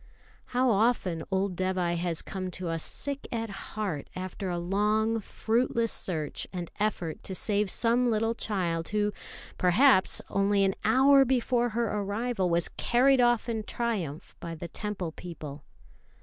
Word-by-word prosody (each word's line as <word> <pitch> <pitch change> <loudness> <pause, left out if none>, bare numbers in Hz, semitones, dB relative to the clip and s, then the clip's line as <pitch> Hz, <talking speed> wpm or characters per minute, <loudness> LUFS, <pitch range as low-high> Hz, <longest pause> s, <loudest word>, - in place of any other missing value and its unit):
How 255 0 +2
often 200 -6 +1
old 190 -1 0
Dévai 185 -1 0
has 170 -1 -2
come 185 -1 -4
to 180 -2 -4
us 165 -1 0
sick 280 -1 -4
at 225 -2 -3
heart 195 -6 -4
after 185 +1 -4
a 175 - -1
long, 210 +5 +1
fruitless 230 +2 0
search 155 -5 -3
and 175 -2 -5
effort 195 -6 -1
to 190 - -4
save 205 +1 0
some 240 +4 +2
little 225 0 +1
child 175 -8 -1
who, 210 0 0 0.5
perhaps, 190 +3 +5
only 200 0 +2
an 195 0 +2
hour 270 +5 +6
before 245 -1 +1
her 235 - +2
arrival 210 -1 -1
was 170 0 +2
carried 255 +2 +4
off 240 -1 +3
in 225 -2 -1
triumph 210 -10 -3
by 165 -1 -6
the 170 +2 -6
Temple 190 -2 -4
people! 155 -4 -8
205 Hz, 150 wpm, -28 LUFS, 180-230 Hz, 0.5 s, hour